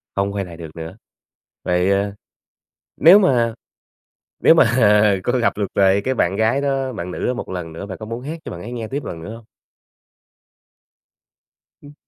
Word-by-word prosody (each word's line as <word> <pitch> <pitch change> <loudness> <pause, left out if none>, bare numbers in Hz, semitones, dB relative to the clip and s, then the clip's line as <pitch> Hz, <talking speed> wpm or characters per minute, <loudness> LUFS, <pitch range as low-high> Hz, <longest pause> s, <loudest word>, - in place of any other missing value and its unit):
không 100 0 0
quay 100 -1 -3
lại 85 -2 -11
được 80 -2 -10
nữa. 80 +3 -8 0.7
Vậy, 90 +2 +1
ơ, 100 +1 0 0.8
nếu 175 +6 +8
mà 120 - +2 0.9
nếu - - +6
mà, - - +6 0.2
ờ, 105 -2 +5
có 125 +1 +1
gặp 120 - +1
được 105 - 0
lại 100 0 +3
cái 130 - 0
bạn 95 -5 0
gái 110 +6 +1
đó, 135 -2 -1
bạn 90 -5 -6
nữ - - -4
đó 125 - 0
một - - -6
lần 90 -3 -5
nữa 85 +5 -7
bạn 95 -3 -8
có 110 - -8
muốn 115 +2 -6
hát 155 +5 -6
cho - - -6
bạn 85 - -8
ấy 120 - -8
nghe 115 -2 -5
tiếp 140 +2 -4
lần 80 -1 -7
nữa 110 +7 -7
hông? 115 - -15 2.4
Ừm. 145 0 -14
105 Hz, 195 wpm, -20 LUFS, 95-125 Hz, 2.4 s, nếu